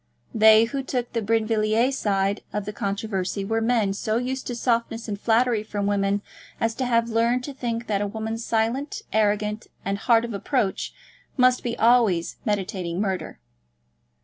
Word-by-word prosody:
They 220 0 +7
who 270 +4 -2
took 250 -2 -3
the 230 - 0
Brinvilliers 225 +3 +1
side 200 -3 0
of 210 -1 -3
the 210 - -5
controversy 200 -2 -2
were 225 +2 0
men 225 -4 +2
so 215 +2 -1
used 260 +2 -3
to 245 - -3
softness 230 -1 -1
and 205 -1 -4
flattery 230 -1 +2
from 205 -1 -3
women 200 0 +1 0.4
as 225 0 +1
to 260 - -1
have 230 -1 +2
learned 235 +2 +2
to 285 - -6
think 235 -3 -3
that 205 -3 0
a 205 - 0
woman 220 +2 -4
silent, 235 +5 -1
arrogant, 210 0 +1 0.2
and 200 +1 -1
hard 230 +2 +3
of 235 - -6
approach, 205 0 -1 0.5
must 250 -1 +4
be 235 -1 -3
always 225 -8 +3
meditating 190 -4 -2
murder. 190 -3 -2
220 Hz, 165 wpm, -24 LUFS, 205-235 Hz, 0.5 s, They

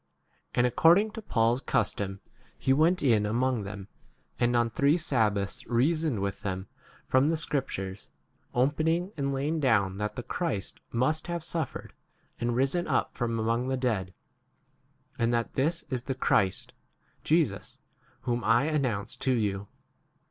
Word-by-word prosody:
And 120 - +4
according 170 - +4
to 225 - -7
Paul's 120 - +1
custom 100 -6 -1 0.4
he 135 - +2
went 165 +5 +3
in 115 -6 +4
among 120 +1 0
them, 100 -1 -7 0.5
and 120 0 +2
on 120 -1 +2
three 140 +7 +3
sabbaths 110 - 0
reasoned 140 0 +1
with 100 0 -3
them 95 -2 -3 0.4
from 130 +1 +4
3 - - +3
the 165 - +1
scriptures, 105 - -3 0.4
opening 160 +8 +1
and 140 -2 -1
laying 145 +4 -1
down 105 -9 +2
that 105 +1 -3
the 125 - -5
Christ 130 - -3
must 150 +8 0
have 170 -2 -3
suffered 160 -4 -4 0.5
and 120 0 0
risen 135 +7 +1
up - - 0
from 115 -2 -1
among 115 +3 0
the 130 0 0
dead, 110 -8 -1 1.1
and 115 0 +2
that 115 -1 -1
this 160 +5 +1
is 125 -2 -1
the 130 +1 -3
Christ, 100 -7 +1 0.5
Jesus - - 0 0.4
whom 120 -1 -1
I 115 +3 +4
announce 135 -10 -1
4 - - -8
to 130 - +3
you. 100 -4 -1
125 Hz, 150 wpm, -28 LUFS, 110-145 Hz, 1.1 s, And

